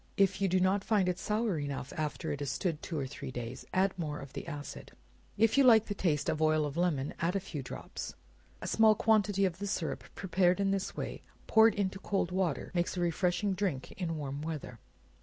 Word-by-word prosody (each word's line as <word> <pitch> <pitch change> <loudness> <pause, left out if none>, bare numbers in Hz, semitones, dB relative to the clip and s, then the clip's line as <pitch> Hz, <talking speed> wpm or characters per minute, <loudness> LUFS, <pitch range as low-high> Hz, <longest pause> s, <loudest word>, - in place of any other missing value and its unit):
If 195 0 +3
you 195 - +3
do 185 0 +2
not 190 +2 +2
find 205 -4 +2
it 180 0 0
sour 210 -5 0
enough, 140 -1 -4
after 155 0 -2
it 145 - -3
has 145 -2 -2
stood 150 +3 -2
two 165 - -4
or 140 - -1
three 130 0 -7
days, 120 -1 -6
add 190 +1 +2
more 150 -3 -2
of 135 - -9
the - - -6
acid. 145 -3 -7 0.4
If 225 +5 +4
you - - +7
like 225 -4 +7
the 205 - -3
taste 160 -7 0
of 155 - 0
oil 155 -1 +3
of 145 -1 -4
lemon, 165 -6 0
add 170 +4 0
a - - +2
few 170 -6 -6
drops. 125 - -7 0.5
A - - -3
small 220 -1 +5
quantity 205 -2 +3
of 180 -1 -2
the 200 - -3
syrup 170 -5 -2
prepared 185 -1 +2
in 195 -1 +2
this 195 -1 -2
way, - - -4 0.2
poured 220 0 +6
into 195 -1 -1
cold 195 -3 -1
water, 180 -5 -1
makes 175 +1 0
a - - 0
refreshing 175 +3 +1
drink 180 -9 -2
in 165 -4 -3
warm 140 -1 -4
weather. 150 -7 -5
180 Hz, 215 wpm, -32 LUFS, 150-195 Hz, 0.5 s, you